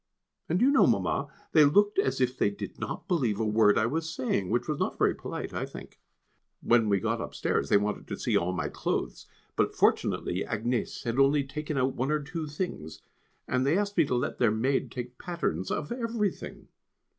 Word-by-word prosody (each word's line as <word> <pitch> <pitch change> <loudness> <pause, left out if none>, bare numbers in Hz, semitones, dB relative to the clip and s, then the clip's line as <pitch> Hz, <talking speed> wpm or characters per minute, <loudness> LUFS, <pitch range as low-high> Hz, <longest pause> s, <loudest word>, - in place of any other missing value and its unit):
And 170 - +2
do 240 - +4
you 275 - +5
know, 280 - +5
Mamma, - - +1 0.2
they 155 - +7
looked 205 - +4
as 400 - +1
if 130 0 +1
they 105 - +2
did 100 - -8
not - - -5
believe 125 - +1
a 110 - +1
word 105 -1 +4
I 110 - +3
was 160 +6 -2
saying; 120 - -1
which 120 +2 0
was 150 -2 -2
not - - -1
very - - +3
polite - - -6
I - - -2
think. - - -10 0.6
When 115 -3 +3
we 100 -1 +3
got - - -1
upstairs 70 - -1
they - - +6
wanted 105 +1 -2
to - - -5
see - - -1
all 90 +1 +2
my 90 - -2
clothes, - - -3 0.3
but - - +1
fortunately 90 +2 +1
Agnès 115 +2 -2
had 120 +2 -1
only 140 +1 +4
taken 150 +2 -4
out 130 0 +1
one 130 +3 -2
or 155 0 +2
two 155 +2 -5
things, 145 - -5 0.4
and 130 0 +1
they 145 +6 +2
asked 205 0 -1
me 165 - +5
to 130 - -1
let 120 - -2
their 120 - +4
maid 125 +6 0
take 125 0 -7
patterns 95 - -2
of 150 - -3
everything. 230 -5 -3
130 Hz, 205 wpm, -28 LUFS, 110-160 Hz, 0.6 s, they